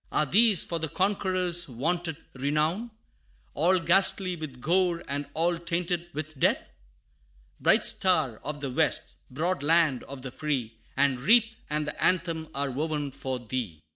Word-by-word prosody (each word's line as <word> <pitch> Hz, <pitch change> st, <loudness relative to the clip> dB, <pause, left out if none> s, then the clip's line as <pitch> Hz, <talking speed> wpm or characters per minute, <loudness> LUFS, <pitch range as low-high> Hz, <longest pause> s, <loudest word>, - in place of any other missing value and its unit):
Are 150 Hz, -, +2 dB
these 205 Hz, -, +4 dB
for 170 Hz, -, -3 dB
the 160 Hz, -, -1 dB
conqueror's 185 Hz, -2 st, +1 dB
vaunted 160 Hz, +5 st, -2 dB, 0.2 s
renown 150 Hz, -, -1 dB, 0.6 s
All 175 Hz, +5 st, +3 dB
ghastly 185 Hz, +2 st, +2 dB
with 155 Hz, -6 st, -8 dB
gore, 175 Hz, +3 st, +1 dB
and 140 Hz, +1 st, -2 dB
all 170 Hz, +1 st, +1 dB
tainted 170 Hz, 0 st, -2 dB
with 155 Hz, -1 st, -6 dB
death? -, -, +1 dB, 0.9 s
Bright -, -, +4 dB
Star 160 Hz, -, +2 dB
of 145 Hz, 0 st, -5 dB
the 135 Hz, -2 st, -3 dB
West -, -, +1 dB, 0.2 s
broad 160 Hz, +5 st, -1 dB
Land 155 Hz, -3 st, +3 dB
of 135 Hz, -1 st, -9 dB
the 130 Hz, -, -6 dB
Free, 130 Hz, -6 st, -3 dB, 0.2 s
The 140 Hz, +1 st, +5 dB
wreath 225 Hz, -, +4 dB
and 150 Hz, 0 st, -1 dB
the 150 Hz, -, -4 dB
anthem 165 Hz, -3 st, +1 dB
are 140 Hz, 0 st, -1 dB
woven 150 Hz, +1 st, -2 dB
for 130 Hz, -1 st, -4 dB
thee! 120 Hz, -8 st, -4 dB
160 Hz, 150 wpm, -27 LUFS, 140-180 Hz, 0.9 s, The